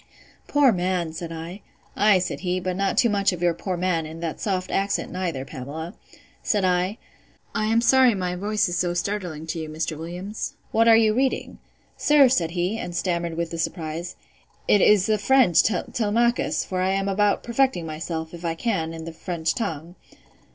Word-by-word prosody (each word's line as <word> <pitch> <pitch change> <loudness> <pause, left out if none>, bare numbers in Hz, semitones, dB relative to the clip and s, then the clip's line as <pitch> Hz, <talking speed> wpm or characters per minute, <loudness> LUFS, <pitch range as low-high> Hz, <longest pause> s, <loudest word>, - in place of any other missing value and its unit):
Poor 290 -3 +4
man! 180 -3 -1
said 165 0 -6
I. 165 +4 -7 0.3
Ay, 205 -1 +5
said 180 - -3
he, 180 0 -1
but 185 0 -3
not 195 +1 -1
too 235 - +5
much 200 -3 +2
of 175 -1 -5
your 175 -1 +3
poor 185 +1 -4
man, 170 -3 0
in 160 +1 -9
that 165 -2 -4
soft 185 -3 -2
accent, 200 +1 -1
neither, 170 -8 -3
Pamela.—Said 160 - -5
I, 180 +3 +1 0.6
I 215 - 0
am 225 +1 +3
sorry 250 -1 +5
my 180 -2 -2
voice 205 +3 0
is 175 - -2
so 175 -1 0
startling 175 -4 -3
to 165 +1 -4
you, 160 -1 -5
Mr. 155 +1 -3
Williams. 175 +6 -6 0.2
What 225 +1 +3
are 225 -1 +8
you 220 -1 +4
reading? 260 +3 -1 0.4
Sir, 290 -3 +5
said 175 -10 +1
he, 185 +6 0
and 175 - -5
stammered 170 -2 -1
with 170 -1 -2
the 165 - -5
surprise, 165 +1 -4 0.5
it 205 - +5
is 205 -3 +5
the 215 -1 +1
French 245 -7 +5
Telemachus; 225 +4 0
for 185 -1 -2
I 185 - +1
am 195 0 -1
about 205 +1 +1
perfecting 235 -7 +1
myself, 160 +1 -5
if 170 0 -9
I 165 -1 -1
can, 165 -5 -2
in 160 0 -7
the 165 - -7
French 165 -1 -2
tongue. 165 -6 -4
180 Hz, 185 wpm, -24 LUFS, 165-210 Hz, 0.6 s, are